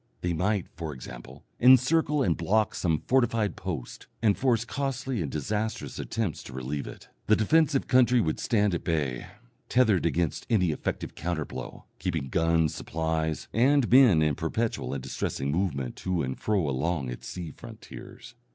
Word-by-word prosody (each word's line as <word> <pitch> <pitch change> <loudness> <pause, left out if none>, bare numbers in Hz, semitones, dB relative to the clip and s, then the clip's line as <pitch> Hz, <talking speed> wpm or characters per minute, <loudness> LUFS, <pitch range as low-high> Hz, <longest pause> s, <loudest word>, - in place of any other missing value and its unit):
They 90 -1 -1
might, 95 +3 0
for 80 -4 -6
example, - - -10 0.2
encircle 135 +4 +5
and 85 -7 +2
block 105 +5 +1
some 80 -4 0
fortified 115 -5 +2
post, 80 -10 -6
and 105 -4 +3
force 120 -4 +1
costly 135 -3 -2
and 75 -5 -3
disastrous 105 - -3
attempts 110 -8 -3
to 70 - -9
relieve 65 +3 -4
it. - - -11 0.2
The 110 - +6
defensive 145 +6 +2
country 125 -1 +4
would 80 -8 0
stand 105 -4 +1
at 85 - -2
bay, 75 -2 -1 0.4
tethered 110 -9 +3
against 85 0 -1
any 95 -8 +3
effective - - -4
counter 80 -2 -3
blow, - - -8
keeping 80 -7 -2
guns, 80 0 +2
supplies, 80 0 -2
and 130 +2 +3
men 120 -11 +7
in 75 -1 +2
perpetual 80 - -2
and 65 - -5
distressing 70 +1 -3
movement 70 -7 -2
to 90 -3 -1
and 65 0 -3
fro 100 -7 0
along 70 0 -1
its - - -8
sea 85 -3 -6
frontiers. - - -11
90 Hz, 160 wpm, -27 LUFS, 80-115 Hz, 0.4 s, men